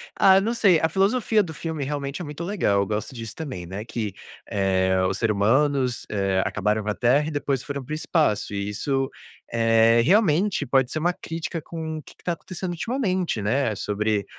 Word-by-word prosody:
ah, 190 Hz, 0 st, +6 dB
não 225 Hz, +4 st, 0 dB
sei, 195 Hz, -8 st, +4 dB
a 160 Hz, -, +2 dB
filosofia 210 Hz, +4 st, +2 dB
do 160 Hz, -3 st, -7 dB
filme 160 Hz, -2 st, -4 dB
realmente 140 Hz, +2 st, -3 dB
é -, -, -5 dB
muito 150 Hz, +3 st, -6 dB
legal, 165 Hz, -, +1 dB
eu 100 Hz, -, 0 dB
gosto 105 Hz, +4 st, -3 dB
disso 115 Hz, -2 st, -7 dB
também, 130 Hz, -, -6 dB
né, 95 Hz, +4 st, -6 dB
que, 110 Hz, -4 st, -4 dB, 0.4 s
eh, 95 Hz, -1 st, +1 dB
o 95 Hz, -, +1 dB
ser 110 Hz, +2 st, 0 dB
humanos, 130 Hz, +4 st, +1 dB
eh, 95 Hz, -2 st, +1 dB
acabaram 105 Hz, +2 st, 0 dB
com 105 Hz, -, -3 dB
a 105 Hz, -, -1 dB
terra 135 Hz, +5 st, +3 dB
e -, -, -3 dB
depois 140 Hz, -3 st, -1 dB
foram 140 Hz, -2 st, -5 dB
para 150 Hz, -, -11 dB
o -, -, 0 dB
espaço 150 Hz, -, 0 dB
e 100 Hz, 0 st, -2 dB
isso, 135 Hz, +5 st, -1 dB, 0.4 s
eh, 115 Hz, 0 st, +4 dB
realmente 185 Hz, -, +3 dB
pode 130 Hz, 0 st, +2 dB
ser 155 Hz, -, -2 dB
uma 175 Hz, +3 st, +2 dB
crítica 165 Hz, 0 st, -5 dB
com 160 Hz, -1 st, -5 dB
o -, -, -6 dB
que -, -, -15 dB
que -, -, -26 dB
tá 175 Hz, -, 0 dB
acontecendo 180 Hz, +1 st, -6 dB
ultimamente, 185 Hz, -, -1 dB
né, 110 Hz, +1 st, +1 dB
sobre, 105 Hz, 0 st, -1 dB
135 Hz, 205 wpm, -24 LUFS, 105-165 Hz, 0.4 s, ah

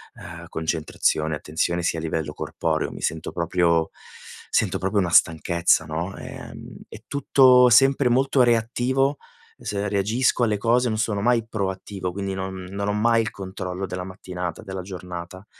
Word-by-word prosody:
uhm, -, -, -10 dB
concentrazione, 80 Hz, -1 st, -1 dB
attenzione 85 Hz, +3 st, -2 dB
sia 85 Hz, -1 st, 0 dB
a -, -, -5 dB
livello 80 Hz, -2 st, -3 dB
corporeo. -, -, -2 dB
Mi -, -, -9 dB
sento 80 Hz, 0 st, -2 dB
proprio, 85 Hz, -1 st, +1 dB, 0.6 s
sento -, -, +1 dB
proprio 95 Hz, +3 st, -1 dB
una 90 Hz, -3 st, 0 dB
stanchezza, 85 Hz, 0 st, +3 dB
no? 80 Hz, +5 st, -4 dB
Ehm, -, -, -9 dB
è -, -, -11 dB
tutto 130 Hz, -3 st, +5 dB
sempre 135 Hz, +1 st, +5 dB
molto 135 Hz, +2 st, +3 dB
reattivo 125 Hz, +4 st, +1 dB, 0.4 s
s -, -, -6 dB
reagisco 110 Hz, +5 st, +1 dB
alle 110 Hz, -2 st, +1 dB
cose, 120 Hz, +4 st, +2 dB
non 110 Hz, -, -1 dB
sono 105 Hz, -2 st, -1 dB
mai 115 Hz, 0 st, +2 dB
proattivo, 95 Hz, -3 st, -4 dB
quindi 100 Hz, +1 st, -4 dB
non 95 Hz, -1 st, -5 dB
non 100 Hz, +1 st, -3 dB
ho -, -, 0 dB
mai 115 Hz, +2 st, +3 dB
il 110 Hz, -, -2 dB
controllo 95 Hz, -1 st, -5 dB
della 90 Hz, -1 st, -5 dB
mattinata, 90 Hz, -2 st, -6 dB
della 95 Hz, -3 st, -6 dB
giornata. 90 Hz, 0 st, -8 dB
95 Hz, 155 wpm, -23 LUFS, 85-115 Hz, 0.6 s, tutto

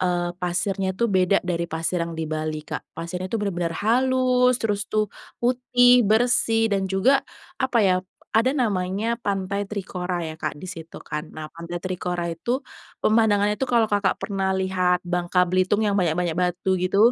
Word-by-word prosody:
eee, 175 Hz, -1 st, 0 dB
pasirnya 190 Hz, +1 st, -1 dB
tu 235 Hz, -, +1 dB
beda 190 Hz, -3 st, +3 dB
dari 170 Hz, -1 st, -2 dB
pasir 165 Hz, +2 st, -2 dB
yang 170 Hz, 0 st, -3 dB
di 160 Hz, -, -2 dB
Bali, 155 Hz, 0 st, -3 dB
Kak. -, -, -4 dB, 0.2 s
Pasirnya 180 Hz, +2 st, -4 dB
itu 230 Hz, -, -1 dB
benar-benar 175 Hz, -6 st, -2 dB
halus, 250 Hz, +1 st, +3 dB
terus 210 Hz, -3 st, -2 dB
tuh 215 Hz, 0 st, +1 dB, 0.3 s
putih, 245 Hz, 0 st, +4 dB
bersih, 225 Hz, -1 st, +3 dB
dan 195 Hz, -1 st, 0 dB
juga 250 Hz, +9 st, +3 dB, 0.4 s
apa 260 Hz, -2 st, +2 dB
ya, 185 Hz, -2 st, +4 dB, 0.4 s
ada 230 Hz, +4 st, +4 dB
namanya 205 Hz, -1 st, 0 dB
pantai 200 Hz, -1 st, -1 dB
Trikora 185 Hz, -3 st, -3 dB
ya, 155 Hz, -, -6 dB
Kak, -, -, -3 dB
di 150 Hz, -, -9 dB
situ 165 Hz, -3 st, -9 dB
kan. 150 Hz, 0 st, -6 dB
Nah, 155 Hz, 0 st, -5 dB
pantai 170 Hz, +1 st, -6 dB
Trikora 180 Hz, -1 st, -3 dB
itu 240 Hz, +10 st, -2 dB, 0.5 s
pemandangannya 210 Hz, -2 st, +3 dB
itu 265 Hz, -, 0 dB
kalau 235 Hz, -2 st, +3 dB
Kakak 205 Hz, -2 st, +1 dB
pernah 195 Hz, -2 st, -2 dB
lihat 185 Hz, -1 st, +1 dB
Bangka 180 Hz, +1 st, +1 dB
Belitung 185 Hz, +4 st, +1 dB
yang 205 Hz, -, +1 dB
banyak-banyak 175 Hz, -2 st, +1 dB
batu 180 Hz, +2 st, 0 dB
gitu. 185 Hz, +2 st, 0 dB
190 Hz, 165 wpm, -24 LUFS, 175-220 Hz, 0.5 s, putih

